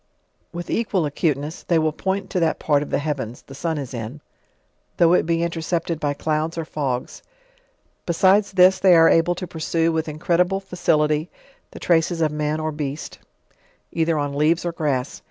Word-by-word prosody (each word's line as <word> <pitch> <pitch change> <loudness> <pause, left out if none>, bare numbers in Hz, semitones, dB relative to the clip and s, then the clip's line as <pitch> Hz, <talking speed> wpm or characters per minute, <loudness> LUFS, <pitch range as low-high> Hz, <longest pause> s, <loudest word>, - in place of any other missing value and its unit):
With 175 0 -6
equal 205 -7 0
acuteness 150 +1 -2
they 170 - +1
will 155 -1 +2
point 190 +5 -3
to 185 - 0
that 165 -2 +1
part 145 -2 +1
of 150 - -5
the - - +1
heavens, 140 -5 -4
the 135 - -13
sun 160 +3 -2
is 140 -3 -6
in, 120 +4 -6 0.8
though 170 0 +5
it 180 - +2
be 165 0 +1
intercepted 170 -1 -2
by 145 -2 -1
clouds 155 +2 -2
or 165 - -3
fogs; 135 -5 -4 0.9
besides 190 +4 +3
this 185 0 +5
they 185 -2 +6
are 165 0 +7
able 165 +2 +3
to 180 - -5
pursue 165 0 -1
with 160 -1 -2
incredible 175 +5 +1
fa 195 -2 -11
cility 150 -2 +1 0.4
the - - -11
traces 170 0 +1
of 155 -2 +1
man 150 +1 -2
or 155 0 -2
beast, 150 0 -5 0.7
either 165 -1 0
on 145 -1 -2
leaves 155 +4 +1
or 175 - -1
grass. 145 -5 -2
160 Hz, 180 wpm, -22 LUFS, 150-170 Hz, 0.9 s, are